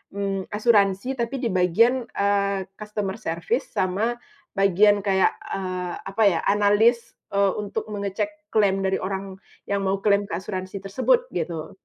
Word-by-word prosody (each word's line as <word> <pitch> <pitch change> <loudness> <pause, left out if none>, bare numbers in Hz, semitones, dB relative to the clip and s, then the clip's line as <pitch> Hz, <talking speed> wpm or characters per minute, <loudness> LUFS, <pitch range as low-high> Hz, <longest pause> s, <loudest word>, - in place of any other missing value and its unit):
mmm, 195 -1 -3
asuransi. 210 +1 +2
Tapi 235 +3 -1
di - - +1
bagian, 230 +8 +2
eee, 200 -1 0 0.2
customer 210 -2 -4
service 170 - -2
sama 205 +6 0 0.4
bagian 200 +1 +4
kayak, 190 -1 +3 0.2
eee, 185 -2 -3 0.2
apa 220 +3 +1
ya, 185 -5 +4
analis, 205 +4 +3 0.2
eee, 200 -1 +2
untuk 205 -1 -4
mengecek 205 0 -3
klaim 195 -2 +2
dari 190 0 0
orang 195 0 -5 0.2
yang 200 0 -1
mau 195 +1 -1
klaim 205 -1 +3
ke - - -4
asuransi 185 +1 -5
tersebut, 260 - +2
gitu. 165 -3 -4
200 Hz, 140 wpm, -24 LUFS, 190-210 Hz, 0.4 s, bagian